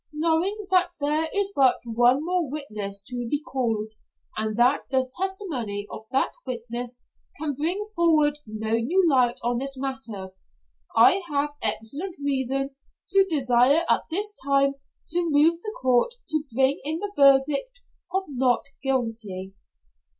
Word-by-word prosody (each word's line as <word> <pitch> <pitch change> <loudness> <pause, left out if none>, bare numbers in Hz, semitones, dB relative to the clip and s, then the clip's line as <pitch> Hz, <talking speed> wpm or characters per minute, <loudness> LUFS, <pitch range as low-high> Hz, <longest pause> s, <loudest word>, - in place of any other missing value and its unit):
Knowing 335 +7 0
that 365 -1 +4
there 300 +2 +1
is 400 0 0
but 265 -2 +4
one 245 +5 +3
more 355 -4 0
witness 210 -9 -4
to 245 +2 -5
be 290 - 0
called, 225 -7 -2 0.4
and 215 0 -2
that 250 +4 +4
the 260 -1 +1
testimony 315 - -3
of 220 - -8
that 270 0 +1
witness 245 0 -5 0.3
can 300 -1 -2
bring 340 +9 -2
forward 305 -4 +3
no 220 +1 -4
new 330 +12 +2
light 250 -5 +3
on 240 0 0
this 275 0 -3
matter, 250 -8 -5 0.6
I 255 +12 +6
have 290 0 0
excellent 280 - -1
reason 270 -1 -1 0.4
to 390 0 +5
desire 275 -1 +3
at - - +2
this 410 +5 -1
time 275 0 +3 0.4
to 345 0 0
move 320 +3 +3
the 430 +2 -6
Court 255 - +2
to 310 -1 0
bring 265 +4 +2
in 310 +3 0
the 405 +3 -5
verdict 280 - +3 0.3
of 380 +1 0
not 260 -3 +1 0.2
guilty." 225 -8 -2
275 Hz, 145 wpm, -25 LUFS, 240-325 Hz, 0.6 s, I